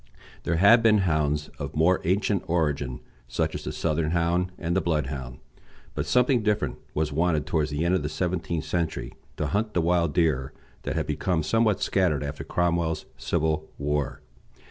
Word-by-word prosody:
There 85 - +1
had 100 +7 +6
been 110 -2 +5
hounds 75 -2 0
of - - -5
more 85 +4 +3
ancient 100 +2 +1
origin, 75 -7 -1 0.3
such - - -1
as - - -6
the - - -2
Southern 80 -1 0
Hound 85 +2 +1
and 85 0 -2
the 95 - +3
Bloodhound; 70 -6 -2 0.6
but - - -3
something 125 0 +3
different 105 -1 0 0.2
was 75 -1 0
wanted 80 -1 +1
towards 75 -2 0
the 75 +3 -1
end 85 - +2
of 95 - +2
the 75 - -3
seventeenth 85 -1 -2
century 85 -2 -2 0.2
to - - -1
hunt 105 +1 -1
the - - +3
wild 85 -2 +1
deer 75 -7 +1 0.3
that - - -2
had - - 0
become 90 -4 0
somewhat 110 +4 +2
scattered 85 -7 +1
after 70 0 -5
Cromwell's 85 -2 0
civil 80 0 -1
war. 75 -1 -2
85 Hz, 170 wpm, -26 LUFS, 75-90 Hz, 0.6 s, had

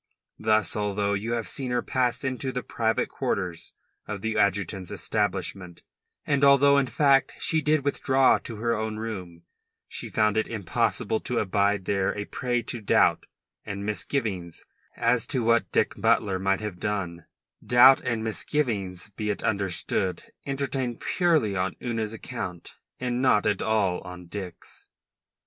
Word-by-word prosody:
Thus, 110 0 +2
although 105 -1 0
you 110 +4 -2
have 115 -1 -2
seen 130 -2 -1
her 125 -1 0
pass 125 -2 0
into 130 0 -2
the 125 0 -4
private 110 -1 0
quarters 90 -4 -3 0.3
of 105 -2 -5
the 110 +1 -2
adjutant's 100 -2 0
establishment, 95 -3 -3 0.4
and 140 -1 +1
although, 140 0 +6
in 135 - 0
fact, 140 0 +3
she 160 -1 +2
did 150 -2 +1
withdraw 135 -2 +3
to 115 - -8
her 115 +2 0
own 110 0 -3
room, 95 -7 -6 0.4
she - - -5
found 105 0 +2
it 110 - +1
impossible 110 0 -1
to 125 - -3
abide 100 -1 +1
there 100 +1 0
a 105 - -3
prey 120 +1 -2
to 115 +1 -6
doubt 105 - +3 0.4
and 100 -1 -5
misgivings 105 - -3 0.3
as 115 0 +2
to 130 -4 +1
what 115 -5 +2
Dick - - +2
Butler 95 -3 +2
might 95 +1 +1
have 105 -4 -5
done 90 -5 -3 0.4
doubt 125 +2 +7
and 115 -2 -2
misgivings, 105 - -2
be 105 -1 -3
it 105 - -2
understood, 95 -2 -1 0.2
entertained 135 -3 -2
purely 160 - +1
on 95 0 -1
Una's 115 -3 -2
account 115 -6 -6 0.3
and 125 0 -1
not 105 -6 +3
at 105 -2 +1
all 100 -4 +1
on 90 0 -9
Dick's. 90 -1 -8
110 Hz, 150 wpm, -26 LUFS, 100-125 Hz, 0.4 s, doubt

